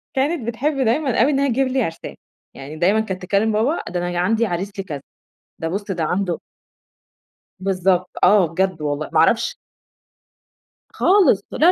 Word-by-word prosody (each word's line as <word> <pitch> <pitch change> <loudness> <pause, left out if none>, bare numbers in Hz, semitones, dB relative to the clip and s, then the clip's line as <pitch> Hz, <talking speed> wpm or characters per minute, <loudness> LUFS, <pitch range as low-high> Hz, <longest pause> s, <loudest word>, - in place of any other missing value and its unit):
كانت 275 -2 0
بتحب 275 +5 -1
دايمًا 250 0 +1
أوي 280 +5 +4
إنّها 280 0 +1
تجيب 260 +2 +1
لي 260 0 0
عرسان. 165 -3 -6 0.4
يعني 140 +3 -9
دايمًا 190 +7 +2
كانت 190 -4 -3
تكلم 200 +4 +1
بابا: 235 +10 +1
"ده 175 0 -2
أنا 175 0 -2
عندي 225 +5 +2
عريس 190 +1 -3
لي 195 - -3
كذا، 145 -7 -6 0.6
ده 165 - -3
بص 200 +4 -3
ده 180 -5 -2
عنده" 180 +1 -1 1.2
بالضبط 185 -1 0
آه، 200 -3 +5
بجد 180 +1 -1
والله 145 0 -3
ما 160 - +2
أعرفش 165 +8 +3 1.3
خالص 370 - +3
لا، - - -6
195 Hz, 160 wpm, -20 LUFS, 175-235 Hz, 1.3 s, آه